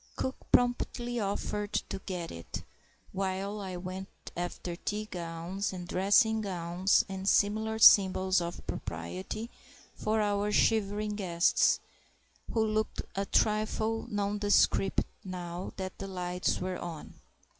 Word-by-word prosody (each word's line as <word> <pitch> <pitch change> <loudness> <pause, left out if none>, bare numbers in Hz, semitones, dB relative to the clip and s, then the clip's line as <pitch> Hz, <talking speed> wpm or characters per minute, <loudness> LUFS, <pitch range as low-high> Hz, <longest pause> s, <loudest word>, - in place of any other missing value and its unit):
Cook 260 - -2 0.2
promptly 245 0 +2
offered 205 0 -2
to - - -2
get 180 -4 -4
it, 85 -1 -7 0.5
while 195 +2 -2
I 190 -3 -5
went 185 +1 -6 0.3
after 175 0 -4
tea 210 +4 -3
gowns 175 +1 -4
and 180 -1 -6
dressing 210 +5 +4
gowns 180 -1 +1
and 190 0 -2
similar 220 +2 +2
symbols 190 -3 +6
of 170 0 -5
propriety 90 - -5 0.4
for 220 +1 0
our 205 0 +1
shivering 210 -1 +2
guests, 175 -4 +3 0.7
who 225 -1 +2
looked 215 0 -1
a 195 0 -2
trifle 215 +1 +1
nondescript 205 -1 +2 0.2
now 180 -1 -5
that 190 -1 -5
the 195 - -4
lights 180 -1 -1
were 185 0 -3
on. 165 -3 -8
195 Hz, 120 wpm, -30 LUFS, 180-210 Hz, 0.7 s, symbols